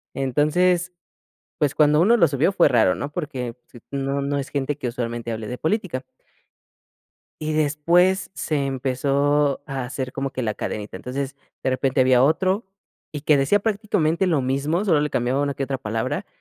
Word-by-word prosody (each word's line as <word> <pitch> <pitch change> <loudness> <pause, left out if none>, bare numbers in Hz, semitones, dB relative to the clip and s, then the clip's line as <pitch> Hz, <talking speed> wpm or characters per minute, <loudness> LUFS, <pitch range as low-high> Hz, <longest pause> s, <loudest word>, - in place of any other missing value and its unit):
entonces, 170 +7 +1 0.7
pues, 145 -2 0
cuando 150 0 +4
uno 230 +7 +5
lo 170 - +5
subió 150 +5 +1
fue 185 -3 +4
raro, 110 -6 +4
¿no?, 140 - -4
porque 130 -7 -4 0.4
no, 140 0 -1
no 140 +1 -1
es 140 - -4
gente 140 0 -2
que 130 - -4
usualmente 120 -1 -4
hable 110 -1 -5
de 125 - -5
política. 160 - -1 1.4
Y 155 0 -1
después 170 +5 +2
se 145 -3 -1
empezó 140 +2 +1
a 135 -3 -4
hacer 130 0 -5
como 135 0 -2
que 130 - -4
la 110 -2 0
cadenita, 105 0 -5
entonces, 135 +2 -4 0.3
de - - +1
repente 130 0 +2
había 130 -1 +4
otro 185 - +2 0.5
y 150 -2 -5
que 150 -1 +4
decía 140 +10 +3
prácticamente 195 -5 0
lo 155 -6 +2
mismo, 140 +8 0
solo 165 -7 +3
le 150 - 0
cambiaba 125 +1 0
una 140 -1 -1
que 135 - -2
otra 135 0 -3
palabra 130 - -3
140 Hz, 170 wpm, -23 LUFS, 130-155 Hz, 1.4 s, uno